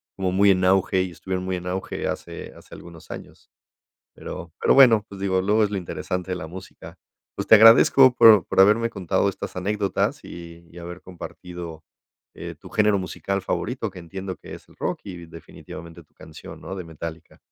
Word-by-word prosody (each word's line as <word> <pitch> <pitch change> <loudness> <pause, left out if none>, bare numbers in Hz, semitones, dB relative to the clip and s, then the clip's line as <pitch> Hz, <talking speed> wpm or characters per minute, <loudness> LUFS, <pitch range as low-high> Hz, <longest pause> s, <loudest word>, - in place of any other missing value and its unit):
como 95 -1 -1
muy 100 +2 +4
en 95 -1 +1
auge, 95 0 +3
y 95 - -6
estuvieron 95 +2 -5
muy 95 0 -2
en 90 0 -8
auge 95 +1 -4
hace - - -6
hace - - -14
algunos 85 -2 -13
años. - - -11 0.6
Pero 80 -2 -9
pero - - +3
bueno, 115 -6 +6
pues 100 - -11
digo, 95 -1 +1
luego 105 +3 +2
es 105 - 0
lo 100 - -2
interesante 90 0 -4
de 90 - -1
la 80 - -7
música. 95 +3 -11 0.4
Pues, - - -4
te - - +9
agradezco 115 +4 +7
por 110 -5 +7
por - - -1
haberme 110 +4 +4
contado 95 -6 -1
estas - - -7
anécdotas, 100 +2 -1
y 85 0 -11
y 90 - -15
haber 90 +1 -9
compartido, 85 -2 -9 0.5
eh, - - -8
tu - - -14
género 105 -1 +2
musical 100 +1 -3
favorito, 115 +4 -3
que 90 - -11
entiendo 95 +2 -7
que - - -12
es - - -16
el - - -20
rock - - -3
y 90 -3 -9
definitivamente 85 0 -12
tu 75 - -40
canción, 80 -1 -12
¿no?, 95 - -7
de 95 - -6
Metallica. 80 0 -9
95 Hz, 190 wpm, -23 LUFS, 85-100 Hz, 0.6 s, te